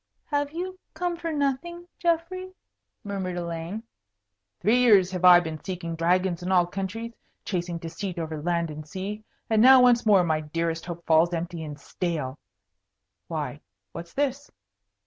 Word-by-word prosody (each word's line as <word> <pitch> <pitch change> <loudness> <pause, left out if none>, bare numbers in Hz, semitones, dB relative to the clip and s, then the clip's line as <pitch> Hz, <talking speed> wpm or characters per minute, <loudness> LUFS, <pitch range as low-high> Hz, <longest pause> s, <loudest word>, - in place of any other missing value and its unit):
"Have 290 -1 -1
you 370 +3 -5 0.2
come 355 -1 -1
for 335 -1 -4
nothing, 315 +5 -2
Geoffrey?" 365 +2 -1 0.5
murmured 190 -3 -3
Elaine. 170 +5 -4 0.8
"Three 235 +4 +3
years 205 -7 +5
have 180 -1 -4
I 180 -1 +9
been 160 -3 -6
seeking 170 -3 -4
dragons 175 +1 +1
in 180 +2 -3
all 180 -2 +5
countries, 195 +6 -5 0.3
chasing 175 -3 -2
deceit 170 +3 -5
over 160 -2 -4
land 170 0 0
and 155 0 -7
sea. 200 +4 -5 0.2
And 220 -1 +3
now 260 +2 +9
once 245 -1 +5
more 200 -4 +5
my 160 -2 +1
dearest 165 +2 -3
hope 170 -1 -7
falls 165 +2 +4
empty 170 0 -4
and 150 -1 -7
stale. 150 -4 -3 0.9
Why, 150 -2 -4 0.3
what's 170 0 -9
this?" 280 0 -1
185 Hz, 150 wpm, -26 LUFS, 165-250 Hz, 0.9 s, I